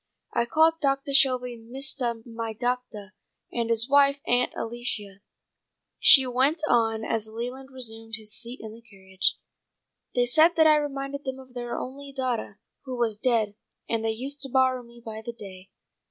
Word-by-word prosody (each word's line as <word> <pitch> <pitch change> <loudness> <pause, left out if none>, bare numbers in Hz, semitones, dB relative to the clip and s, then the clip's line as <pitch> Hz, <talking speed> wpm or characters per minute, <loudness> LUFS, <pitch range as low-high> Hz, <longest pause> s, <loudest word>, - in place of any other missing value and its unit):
I 235 0 +1
called 320 +4 +3
Doctah 275 -1 0
Shelby 255 -3 +3
'Mistah 240 -1 -3
my 230 -1 -5
doctah' 245 -4 -3 0.4
and 235 -1 -2
his 230 +1 +2
wife 280 0 +4
'Aunt 245 0 +2
Alicia,'" 225 -4 -4 0.8
she 265 -2 +8
went 265 +6 +1
on 225 -2 +2
as 220 -1 -1
Leland 250 +4 -6
resumed 225 -4 -1
his 215 -1 -7
seat 235 +3 -6
in 220 -1 -7
the 230 - -13
carriage. 190 -4 -1 0.8
"They 245 -1 +3
said 315 +7 +5
that 320 - +5
I 305 -1 +7
reminded 280 -1 -3
them 265 -1 -4
of 260 -1 -14
their 240 -1 -4
only 275 +2 -7
daughtah, 255 -6 -3 0.3
who 255 -2 -5
was 230 -3 0
dead, 220 -3 +1 0.3
and 225 -1 -1
they 225 - 0
used 270 +6 -4
to 270 - -3
borrow 260 -1 +2
me 235 0 -16
by 220 -1 -6
the 235 - -6
day. 190 -4 -11
245 Hz, 170 wpm, -26 LUFS, 225-270 Hz, 0.8 s, she